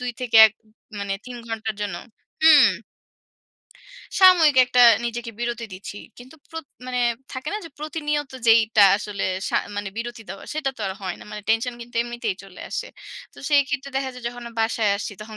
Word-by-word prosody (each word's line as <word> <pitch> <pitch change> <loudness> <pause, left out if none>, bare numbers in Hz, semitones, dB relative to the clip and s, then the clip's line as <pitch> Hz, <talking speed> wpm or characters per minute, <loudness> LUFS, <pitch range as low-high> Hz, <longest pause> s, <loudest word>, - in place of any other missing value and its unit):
২ 250 0 -3
থেকে 235 -3 +1
১ 215 - -5
উম 215 - -28 0.3
মানে 200 -1 -3
৩ 245 -1 -7
ঘন্টার 220 -1 -3
জন্য 200 -4 -3 0.5
হুম। 310 -2 +8 1.5
সাময়িক 340 -7 +7
একটা 250 0 +4 0.2
নিজেকে 235 0 -4
একটা 215 - -23
বিরতি 235 -1 -3
দিচ্ছি। 195 +2 -8 0.2
কিন্তু 255 +5 -13 0.2
প্রত 325 -1 -7 0.2
মানে 250 -1 -2 0.3
থাকে 260 +3 -5
না? 420 - -2
যে 330 - -10
প্রতিনিয়ত 295 -2 -3
যেইটা 225 -2 +6
আসলে 210 -1 -4 0.2
সা - - 0 0.2
মানে 205 -1 -3
বিরতি 235 0 -6
দেওয়া 195 - -8
সেটা 285 -3 -1
তো - - -12
আর - - -3
হয় 185 -2 -3
না। - - -11
মানে 210 -1 -7
টেনশন 230 +2 +1
কিন্তু 240 +1 -11
এমনিতেই 240 -5 -4
চলে 195 -2 -13
আসে। - - -4 0.4
তো - - -17
সেই 290 -1 +5
ক্ষেত্রে 280 -1 -4
দেখা 270 -1 -1
যায় 250 -1 -11
যখন 245 0 -10
অ - - -17
বাসায় 225 -2 +1
আসছি 205 - -5
তখন 215 0 -10
240 Hz, 190 wpm, -23 LUFS, 215-270 Hz, 1.5 s, হুম